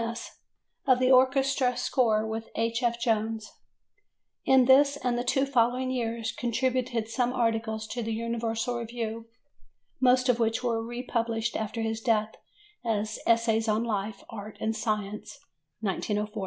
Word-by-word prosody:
MS. 230 Hz, 0 st, -5 dB, 0.6 s
of 255 Hz, -2 st, +6 dB
the 255 Hz, +1 st, +3 dB
orchestral 260 Hz, 0 st, +3 dB
score 230 Hz, -4 st, +2 dB
with 220 Hz, 0 st, -5 dB
H. 230 Hz, +1 st, 0 dB
F. 235 Hz, -1 st, 0 dB
Jones. 220 Hz, -1 st, -1 dB, 0.9 s
In 265 Hz, -1 st, +5 dB
this 280 Hz, +2 st, +5 dB
and 250 Hz, -3 st, -1 dB
the 240 Hz, -, -1 dB
two 270 Hz, +2 st, +2 dB
following 255 Hz, 0 st, +1 dB
years 230 Hz, -2 st, -2 dB
contributed 245 Hz, -1 st, -1 dB
some 245 Hz, +2 st, 0 dB
articles 225 Hz, -2 st, -1 dB
to 245 Hz, -, -3 dB
the 225 Hz, 0 st, -3 dB
Universal 230 Hz, +1 st, -2 dB
Review, 230 Hz, -1 st, -5 dB, 0.7 s
most 255 Hz, 0 st, +4 dB
of 245 Hz, -2 st, +3 dB
which 225 Hz, +1 st, +1 dB
were 230 Hz, -2 st, 0 dB
republished 235 Hz, -1 st, -2 dB
after 220 Hz, +1 st, -3 dB
his 225 Hz, 0 st, -2 dB
death 220 Hz, -2 st, +1 dB, 0.5 s
as 215 Hz, -2 st, -1 dB
Essays 230 Hz, -1 st, +3 dB
on 215 Hz, +1 st, +2 dB
Life, 210 Hz, -2 st, -3 dB
Art, 215 Hz, -1 st, -8 dB
and 220 Hz, 0 st, -1 dB
Science 210 Hz, +3 st, -3 dB, 0.4 s
(1904). 210 Hz, +1 st, -2 dB
230 Hz, 140 wpm, -28 LUFS, 220-250 Hz, 0.9 s, of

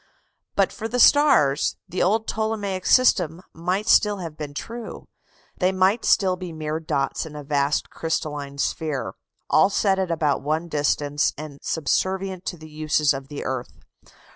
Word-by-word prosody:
But -, -, +2 dB
for 225 Hz, -, -5 dB
the 245 Hz, +2 st, -2 dB
stars 245 Hz, -, +4 dB
the 180 Hz, 0 st, -3 dB
old 220 Hz, +4 st, +2 dB
Ptolemaic 210 Hz, -4 st, -2 dB
system 180 Hz, -, +3 dB
might 180 Hz, +6 st, -2 dB
still 210 Hz, -3 st, +4 dB
have 165 Hz, -5 st, -6 dB
been 150 Hz, -2 st, -7 dB
true. 230 Hz, +7 st, -7 dB, 0.5 s
They 185 Hz, 0 st, +3 dB
might 190 Hz, +4 st, +2 dB
still 185 Hz, -2 st, +3 dB
be 180 Hz, -1 st, -7 dB
mere 155 Hz, 0 st, -3 dB
dots 140 Hz, -4 st, -1 dB
in 155 Hz, -2 st, -9 dB
a 150 Hz, -, -7 dB
vast 145 Hz, 0 st, 0 dB
crystalline 150 Hz, -3 st, -3 dB
sphere, 150 Hz, 0 st, -2 dB, 0.3 s
all 195 Hz, -, +4 dB
set 195 Hz, -1 st, +1 dB
at 190 Hz, -2 st, -1 dB
about 155 Hz, -4 st, 0 dB
one 155 Hz, +4 st, -1 dB
distance, 145 Hz, -1 st, 0 dB
and 145 Hz, -2 st, -8 dB
subservient 190 Hz, +4 st, -1 dB
to 175 Hz, -, -4 dB
the 155 Hz, 0 st, -13 dB
uses 150 Hz, -1 st, +1 dB
of 135 Hz, 0 st, -6 dB
the 145 Hz, 0 st, -7 dB
earth. 130 Hz, -2 st, -4 dB
165 Hz, 160 wpm, -23 LUFS, 150-190 Hz, 0.5 s, stars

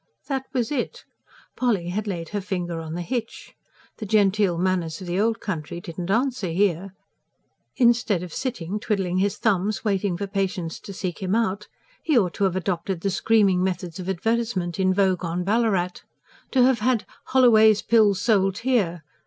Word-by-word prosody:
That 265 Hz, -2 st, -2 dB
was 245 Hz, -2 st, -1 dB
it! 270 Hz, -5 st, -3 dB, 0.5 s
Polly 210 Hz, -9 st, 0 dB
had 210 Hz, +4 st, -3 dB
laid 170 Hz, -4 st, -4 dB
her 205 Hz, -1 st, -3 dB
finger 180 Hz, -4 st, -3 dB
on 160 Hz, 0 st, -6 dB
the 175 Hz, -, -3 dB
hitch. 230 Hz, +3 st, -5 dB, 0.4 s
The 215 Hz, -, -6 dB
genteel 200 Hz, -3 st, +3 dB
manners 175 Hz, -3 st, -1 dB
of 185 Hz, -, -8 dB
the 175 Hz, +2 st, -1 dB
old 225 Hz, +2 st, +1 dB
country 170 Hz, -4 st, -4 dB
did 170 Hz, 0 st, -9 dB
not 175 Hz, +1 st, -4 dB
answer 245 Hz, 0 st, 0 dB
here; 190 Hz, +1 st, 0 dB, 0.8 s
instead 235 Hz, -7 st, +3 dB
of 175 Hz, -3 st, -8 dB
sitting 210 Hz, -7 st, -3 dB
twiddling 195 Hz, -5 st, -1 dB
his 200 Hz, +1 st, 0 dB
thumbs, 205 Hz, -1 st, 0 dB
waiting 195 Hz, -3 st, 0 dB
for 200 Hz, -, -3 dB
patients 195 Hz, -4 st, -3 dB
to -, -, -10 dB
seek 185 Hz, -3 st, -4 dB
him 190 Hz, +2 st, 0 dB
out, 210 Hz, -3 st, -1 dB, 0.3 s
he 310 Hz, -5 st, +2 dB
ought 185 Hz, -7 st, +2 dB
to 200 Hz, -, 0 dB
have 185 Hz, -2 st, 0 dB
adopted 180 Hz, -1 st, -2 dB
the 195 Hz, -, 0 dB
screaming 195 Hz, -2 st, +3 dB
methods 180 Hz, -2 st, -3 dB
of 185 Hz, +1 st, -5 dB
advertisement 190 Hz, -2 st, -1 dB
in 185 Hz, -1 st, +3 dB
vogue 185 Hz, -2 st, +1 dB
on 170 Hz, +1 st, -2 dB
Ballarat. 195 Hz, -4 st, 0 dB, 0.5 s
To 255 Hz, -2 st, +3 dB
have 255 Hz, -2 st, +3 dB
had 235 Hz, 0 st, +1 dB, 0.2 s
"Holloway's 220 Hz, -5 st, +5 dB
Pills 215 Hz, -4 st, +4 dB
sold 195 Hz, -4 st, +2 dB
here!" 185 Hz, -11 st, +1 dB
195 Hz, 175 wpm, -24 LUFS, 180-220 Hz, 0.8 s, Holloway's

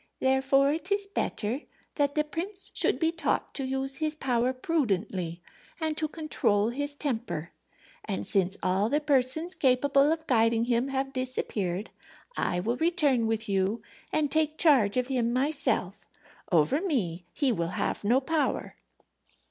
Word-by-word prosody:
"Therefore 270 Hz, +2 st, +3 dB
it 335 Hz, +5 st, -5 dB
is 405 Hz, 0 st, +2 dB
better 255 Hz, -, -2 dB, 0.3 s
that 285 Hz, -1 st, 0 dB
the 300 Hz, -, +3 dB
prince 375 Hz, +6 st, -5 dB
should -, -, +3 dB
be 325 Hz, -1 st, +1 dB
taught 330 Hz, -1 st, -1 dB
to 275 Hz, -, -2 dB
use 265 Hz, +1 st, -1 dB
his 310 Hz, 0 st, 0 dB
power 250 Hz, -4 st, +1 dB
prudently 195 Hz, -, -2 dB, 0.4 s
and 315 Hz, -1 st, -1 dB
to 310 Hz, -, 0 dB
control 230 Hz, -10 st, 0 dB
his 285 Hz, +4 st, -2 dB
temper. 220 Hz, -, -3 dB, 0.5 s
And 100 Hz, +1 st, -3 dB
since 190 Hz, -1 st, +1 dB
all 190 Hz, +4 st, +1 dB
the 290 Hz, +3 st, +2 dB
persons 295 Hz, +4 st, +2 dB
capable 275 Hz, +1 st, +3 dB
of 320 Hz, 0 st, -2 dB
guiding 230 Hz, -2 st, +2 dB
him 240 Hz, +1 st, +1 dB
have 270 Hz, 0 st, -2 dB
disappeared, 215 Hz, -7 st, -2 dB, 0.4 s
I 175 Hz, -, 0 dB
will 230 Hz, +7 st, -1 dB
return 295 Hz, -8 st, +2 dB
with 225 Hz, 0 st, -2 dB
you 195 Hz, +3 st, 0 dB, 0.3 s
and 295 Hz, -2 st, 0 dB
take 310 Hz, 0 st, +1 dB
charge 255 Hz, -10 st, +4 dB
of 250 Hz, -, +2 dB
him 245 Hz, -3 st, 0 dB
myself. 280 Hz, +4 st, 0 dB, 0.4 s
Over 175 Hz, -, +3 dB
me 185 Hz, -, -2 dB
he 275 Hz, -3 st, +1 dB
will 170 Hz, -7 st, -1 dB
have -, -, -2 dB
no 240 Hz, +6 st, +4 dB
power." 305 Hz, +2 st, -1 dB
265 Hz, 150 wpm, -28 LUFS, 220-300 Hz, 0.5 s, charge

